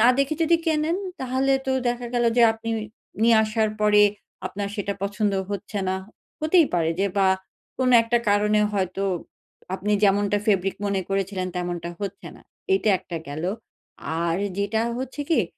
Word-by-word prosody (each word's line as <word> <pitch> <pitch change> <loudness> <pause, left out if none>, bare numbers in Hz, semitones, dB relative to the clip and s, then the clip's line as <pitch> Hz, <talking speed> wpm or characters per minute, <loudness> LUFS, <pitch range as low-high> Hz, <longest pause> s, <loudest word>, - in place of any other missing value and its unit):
না 230 - +6
দেখে 275 +3 +2
যদি 335 +1 +4
কেনেন 315 +2 +1 0.2
তাহলে 260 +1 +1
তো 265 - +1 0.2
দেখা 240 0 -2
গেল 240 0 +2
যে 240 - +6
আপনি 225 +1 -6 0.5
নিয়ে 230 -1 +6
আসার 215 0 +1
পরে 210 0 +5 0.4
আপনার 200 0 -4
সেটা 200 0 -2
পছন্দ 205 +1 0 0.2
হচ্ছে 200 +1 -4
না। 190 - 0 0.4
হতেই 315 0 +4
পারে 165 -1 +2
যে 200 - +3
বা 195 -1 +4 0.5
কোনো 255 -1 +3
একটা 235 +1 +1
কারণে 210 +1 +3
হয়তো 195 -1 -1 0.7
আপনি 210 +2 -1
যেমনটা 205 +1 +3
ফেব্রিক 195 -2 +1
মনে 200 -1 0
করেছিলেন 195 -1 -1
তেমনটা 175 -1 -3
হচ্ছে 200 -1 -5
না। - - -18 0.3
এইটা 225 - +3
১টা 170 - -7
গেলো। 155 +5 -2 0.7
আর 170 0 +1 0.2
যেটা 205 +2 0 0.2
হচ্ছে 260 +3 -5
গিয়ে - - +4
210 Hz, 160 wpm, -24 LUFS, 195-240 Hz, 0.7 s, না